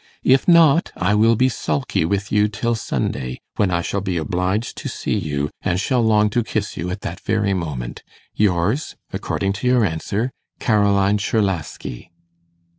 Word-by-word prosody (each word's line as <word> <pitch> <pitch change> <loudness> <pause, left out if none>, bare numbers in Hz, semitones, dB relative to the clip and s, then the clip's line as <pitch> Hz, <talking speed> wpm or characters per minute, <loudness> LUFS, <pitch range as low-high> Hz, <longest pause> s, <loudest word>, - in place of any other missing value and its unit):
If 130 +1 +4
not, 165 -2 +5
I 95 +4 +1
will 110 +2 +4
be 130 +4 +3
sulky 75 - -1
with 100 +3 -1
you 105 0 +4
till 110 +3 -1
Sunday, 65 - -3 0.2
when 100 - +2
I 85 -1 0
shall 100 - -2
be 95 -2 -2
obliged 90 +6 -1
to - - -4
see - - -3
you, 75 -6 -2
and 90 0 0
shall 125 +4 +1
long 105 -2 +3
to 120 +2 +1
kiss 110 -1 -3
you 90 +1 -3
that 95 -3 -6
very 100 -2 0
moment. 75 -10 -4 0.3
Yours, 105 - +1 0.2
according 95 0 -1
to 100 +5 -3
your 125 -3 +4
answer, 100 +8 -2 0.3
'CAROLINE 100 -3 +3
CZERLASKI. 95 - -2
100 Hz, 160 wpm, -21 LUFS, 90-110 Hz, 0.3 s, not